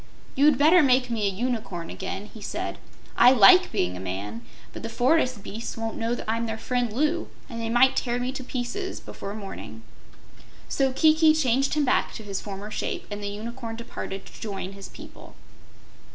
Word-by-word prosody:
"You'd 285 0 +4
better 320 +6 +6
make 255 -3 +3
me 215 -3 0
a - - +1
Unicorn 215 -5 -3
again," 190 +1 -5
he 220 - -11
said. - - -4 0.4
"I 245 +2 +7
like 360 - +7
being 90 0 0
a - - -6
man, 100 +4 -5 0.3
but - - -7
the 230 - -5
forest 250 -1 +2
beasts 225 +3 -6
won't 225 0 -3
know 230 +2 -1
I'm 230 +1 0
their 220 0 -3
friend, 245 0 -1
Loo, 305 +8 0 0.2
and 230 -3 -6
they 225 - -2
might 245 +3 +5
tear 240 -1 0
me 250 +1 -2
in 265 -1 -6
pieces 270 +12 -4
before 200 +1 -7
morning." 195 - -8 0.8
So 270 -1 +1
Kiki 310 +3 +5
changed 275 -1 +2
him 300 -1 +2
back 255 - +1
to 220 - -7
his 200 -2 -4
former 200 +1 -7
shape, - - -3
and 205 0 -4
the 205 - -3
Unicorn 225 +3 -6
departed 210 -4 -6
to - - -14
join 195 -3 -4
his 195 0 -10
people. - - -13
230 Hz, 185 wpm, -26 LUFS, 205-265 Hz, 0.8 s, I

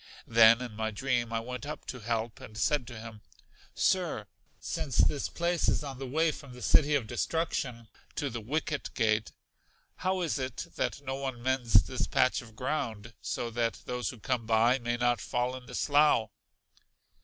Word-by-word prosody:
Then 115 +1 +7
in 125 - -6
my 110 0 -1
dream 120 0 -1
I 115 0 0
went 125 0 -6
up 150 - -6
to 125 - -6
Help 115 0 -2
and 110 - -10
said 125 +4 +1
to 120 -3 -8
him, 110 -1 -9 0.5
Sir, - - +1 0.3
since 135 -5 -3
this 145 - +3
place 170 0 +1
is - - +1
on 135 -3 -6
the 135 - -4
way 160 +5 +2
from 140 -3 -10
The 125 - -9
City 150 0 +5
of 135 -6 +1
Destruction 125 -4 -2 0.3
to 140 -2 -2
The 115 0 -4
Wicket 150 +5 -2
Gate, 110 -2 +2 0.7
how 185 0 0
is 165 -4 0
it 130 0 -3
that - - -1
no 135 -1 -3
one 135 -3 -4
mends 120 -6 +4
this 130 - -2
patch 130 +3 +2
of 115 -3 -14
ground, 115 -5 -3
so 115 +8 -3
that 115 0 -1
those 125 0 -2
who 125 - -7
come 120 -1 -1
by 115 +3 +4
may 120 0 -1
not 120 0 +2
fall 125 0 -1
in 125 -1 -10
the - - -7
slough? 145 -7 +4
125 Hz, 185 wpm, -30 LUFS, 115-140 Hz, 0.7 s, Then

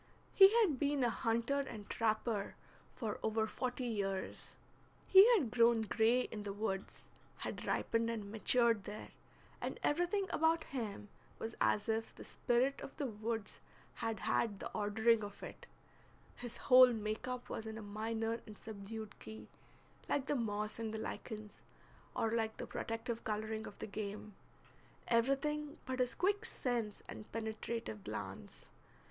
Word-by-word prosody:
He 390 0 +9
had 315 - +2
been 285 -2 +2
a 240 - +3
hunter 235 +4 +1
and 220 -7 -5
trapper 215 -2 0 0.4
for 220 -4 -3
over 220 0 +1
forty 250 +3 -3
years; 195 -4 -3 0.5
he 390 +5 +9
had 275 - +1
grown 230 -1 +5
gray 225 +3 +3
in 220 -3 -5
the 205 -1 -4
woods, 195 -2 -3 0.3
had - - -5
ripened 230 0 +1
and 210 -3 -4
matured 230 -1 +3
there, 210 +1 -6 0.5
and - - -3
everything 350 +6 +2
about 320 +1 +3
him 215 -5 -5 0.3
was 225 +1 -4
as 205 - +3
if 225 0 -1
the - - -9
spirit 250 +3 +1
of - - -8
the 290 - -1
woods 220 -2 -3 0.3
had 225 -3 -3
had 220 -2 +1
the - - -5
ordering 220 +2 +3
of 205 0 -8
it; - - -9 0.7
his 240 -1 -7
whole 255 -1 +8
make 215 +1 -3
up 250 -1 -4
was 220 - -4
in 220 0 -5
a 220 - -6
minor 225 +2 -2
and 210 -1 -10
subdued 215 0 -7
key, 220 0 -9 0.6
like 280 -2 +1
the 295 - 0
moss 215 -3 -2
and 220 -1 -3
the - - -2
lichens, 215 -1 -6 0.5
or 225 - +1
like 225 -1 0
the - - -4
protective 225 +1 -3
coloring 220 +1 -2
of 205 - -10
the - - -5
game, 210 0 -5 0.7
everything 290 +6 +1
but 260 0 -3
his 250 -1 +1
quick 405 +3 +1
sense 240 - -2
and 215 - -9
penetrative 220 - -4
glance. - - -7
225 Hz, 155 wpm, -36 LUFS, 215-250 Hz, 0.7 s, He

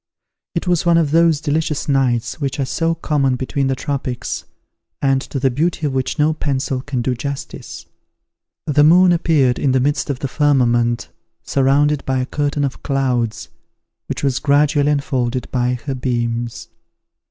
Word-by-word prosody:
It 170 - -1
was 175 -2 +2
one 170 -1 +4
of 155 -4 +1
those 165 -1 +4
delicious 155 0 -1
nights 130 -2 0
which 140 +1 -2
are 135 - +1
so 165 +5 0
common 145 -5 0
between 135 +2 -2
the 135 - 0
tropics, 135 -2 -4 0.5
and 135 -1 +2
to 135 - -5
the 135 0 +2
beauty 160 +4 -1
of 140 - -1
which 130 +2 -2
no 155 +1 +3
pencil 135 -3 -2
can 130 -3 -3
do 130 - 0
justice. 140 +3 -6 0.8
The 145 -1 +3
moon 180 +4 +6
appeared 155 -7 +2
in 135 -3 +1
the 130 - +3
midst 145 +3 0
of 140 - -1
the 135 - -3
firmament, 120 -5 +1 0.3
surrounded 140 +2 +2
by 130 -1 -1
a 130 - 0
curtain 145 +1 -1
of 140 -1 -3
clouds, 125 -5 -1 0.6
which - - -4
was 135 -2 +1
gradually 145 0 +3
unfolded 130 -4 -1
by 125 0 0
her 140 - -2
beams. 120 -2 -3
140 Hz, 165 wpm, -19 LUFS, 130-150 Hz, 0.8 s, moon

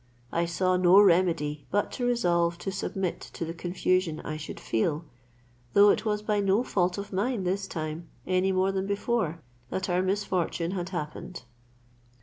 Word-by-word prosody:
I 170 +1 +1
saw 185 +2 +1
no 180 +2 +7
remedy 170 -6 +3
but 205 +1 0
to 245 - -2
resolve 170 -8 +2
to 195 - -4
submit 190 -1 -3
to 165 - -4
the 165 - -5
confusion 180 -1 0
I 155 - -5
should 155 - -7
feel, 150 +8 -1 0.7
though 205 0 +7
it - - -1
was 210 -1 0
by 210 -1 +1
no 200 +3 +2
fault 180 -6 0
of 200 0 -6
mine 210 +2 0
this 195 +2 -1
time, 160 0 -5 0.2
any 185 +1 +2
more 190 +1 +2
than 190 0 -2
before, 200 -5 -1 0.3
that 190 -1 -3
our 180 +1 +2
misfortune 185 -3 -1
had 180 -2 -3
happened. 170 0 -6
185 Hz, 165 wpm, -28 LUFS, 170-200 Hz, 0.7 s, no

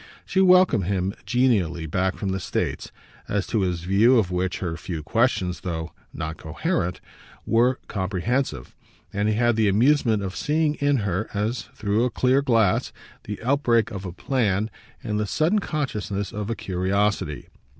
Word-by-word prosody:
She 190 - +1
welcomed 180 - +5
him 95 0 -1
genially 100 -10 +1
back 95 +4 -1
from 100 - -3
the 95 0 -1
States, - - -3 0.4
as 105 0 -1
to 110 - 0
his 90 -3 -1
view 100 +8 +4
of 95 -6 +1
which 90 +1 -1
her 85 -3 -3
few 85 -2 -6
questions, 90 - +1
though 80 -2 -4 0.2
not 80 +1 -5
coherent, 90 - -2 0.5
were 120 +3 +3
comprehensive, 95 - -2 0.4
and 105 +1 +1
he 110 - +1
had 120 0 +2
the 110 -1 +3
amusement 115 0 +3
of 95 -1 -4
seeing 150 0 +1
in 145 -1 +3
her, 100 +3 -1
as 110 +3 -2
through 105 -1 0
a 125 - +2
clear 130 +3 +2
glass, 115 -8 +2 0.3
the 105 -1 -5
outbreak 120 -4 +2
of 100 -3 -6
a 90 - -5
plan 105 0 0 0.3
and 105 -2 -1
the 105 - -1
sudden 165 - +2
consciousness 105 - -3
of 105 0 -4
a 115 - -1
curiosity. 95 -4 -1
105 Hz, 160 wpm, -24 LUFS, 95-125 Hz, 0.5 s, welcomed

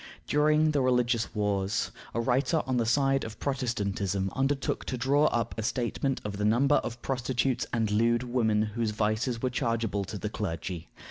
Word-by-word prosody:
During 155 +1 +3
the 145 -2 +1
religious 125 -3 +1
wars, 100 0 0 0.2
a - - +1
writer 130 +6 +1
on 130 -1 0
the 115 -2 +1
side 135 +2 +2
of 110 0 -7
Protestantism 100 -8 -1
undertook 135 0 0
to 130 - -3
draw 140 +4 +3
up 115 -5 0
a - - 0
statement 125 +4 -1
of 100 -1 -4
the 105 - -2
number 125 +7 +4
of 120 0 -4
prostitutes 130 -1 0
and 110 -3 0
lewd 115 +3 +2
women 115 -4 +1
whose 110 +1 -1
vices 110 +3 -1
were 130 - +1
chargeable 115 -5 -1
to 105 - -6
the 105 - -3
clergy. 90 -4 -4
120 Hz, 175 wpm, -28 LUFS, 105-130 Hz, 0.2 s, number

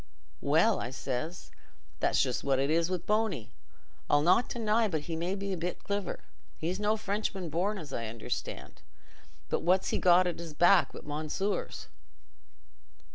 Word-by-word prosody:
'Well,' 165 +10 +3
I 120 - -3
says, 135 +6 -4 0.5
'that's - - +3
just 130 -3 -2
what 135 -1 +2
it 135 +3 +1
is 165 +1 +2
wi' 185 - 0
Bony. 180 - -1 0.6
I'll 145 0 +4
not 185 +9 +4
deny 225 -1 +2
but 160 -6 -1
he 165 +2 -4
may 175 +4 -1
be 200 0 -3
a - - -3
bit 175 +2 -4
cliver—he's 190 -2 -5
no 210 +1 +2
Frenchman 200 -4 -2
born, 195 +6 0
as 150 -7 -8
I 115 -1 -2
understand—but 90 - -7
what's 185 +2 +2
he - - 0
got 180 0 +6
at's 170 -2 -4
back 175 +3 +5
but - - -10
mounseers? 155 +7 -2
175 Hz, 150 wpm, -30 LUFS, 150-200 Hz, 0.6 s, got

